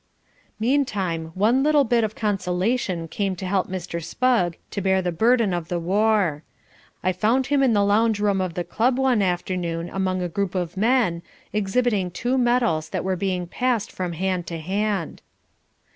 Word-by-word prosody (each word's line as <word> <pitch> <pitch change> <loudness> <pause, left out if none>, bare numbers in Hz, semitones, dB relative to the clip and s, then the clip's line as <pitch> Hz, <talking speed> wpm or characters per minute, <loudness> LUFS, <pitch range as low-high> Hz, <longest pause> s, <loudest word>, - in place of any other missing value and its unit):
Meantime, 205 - 0
one 225 +7 +3
little 295 0 +4
bit 235 -2 +2
of 220 0 -2
consolation 190 -4 -1
came 195 +2 -2
to 185 - -6
help 190 0 0
Mr. 175 -2 -5
Spugg 180 -2 +1
to 200 - -3
bear 190 0 +2
the 180 -1 -1
burden 225 +2 +2
of 175 -2 -3
the 175 - -2
war. 195 -3 +1 0.6
I 185 - +2
found 225 +8 +1
him 280 +1 +2
in 260 -4 +4
the 205 -1 +3
lounge 215 +1 +2
room 200 -2 +1
of 180 -3 -3
the 175 - -1
club 245 +7 +1
one 260 -5 +2
afternoon 175 -2 -2
among 185 -1 -1
a - - -1
group 190 +2 -2
of 175 -1 -2
men, 215 -5 +2 0.3
exhibiting 210 -1 +1
two 245 +8 -1
medals 240 -11 +1
that - - -3
were 190 0 0
being 185 -1 -2
passed 235 +4 -1
from 180 -2 -4
hand 180 0 -2
to 170 - -4
hand. 195 +2 -2
195 Hz, 175 wpm, -23 LUFS, 180-230 Hz, 0.6 s, little